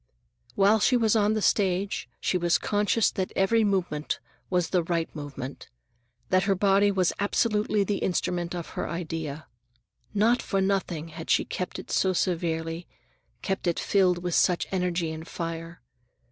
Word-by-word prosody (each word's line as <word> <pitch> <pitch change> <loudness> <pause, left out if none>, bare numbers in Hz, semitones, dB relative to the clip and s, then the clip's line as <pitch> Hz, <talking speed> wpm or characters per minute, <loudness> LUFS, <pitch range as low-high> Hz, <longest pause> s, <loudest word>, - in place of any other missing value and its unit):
While 205 +3 +4
she 250 +4 +4
was 225 -2 +2
on 215 0 +3
the 215 - -1
stage 195 -1 +1
she - - 0
was 175 -1 +3
conscious 210 +2 +1
that 190 -1 -3
every 220 +4 +3
movement 180 -7 -1 0.3
was 180 -3 +1
the 180 - +3
right 165 -1 -2
movement, 140 -2 -7 0.6
that 185 0 +3
her 195 -1 +2
body 200 +1 +4
was 185 -3 +1
absolutely 210 0 +1
the 200 +1 -1
instrument 175 -1 -1
of 170 -2 -5
her - - -4
idea. 160 -3 -4 0.7
Not 225 +4 +3
for 195 - -1
nothing 190 -5 -1
had 160 0 -9
she - - +3
kept 180 - -4
it - - -8
so 190 -1 +2
severely, 165 -2 -1 0.6
kept 195 -2 -2
it 170 - +1
filled 180 -3 +2
with 175 -1 -2
such 180 +1 +3
energy 180 -3 0
and 160 +1 -7
fire. 165 0 -6
180 Hz, 160 wpm, -27 LUFS, 165-200 Hz, 0.7 s, While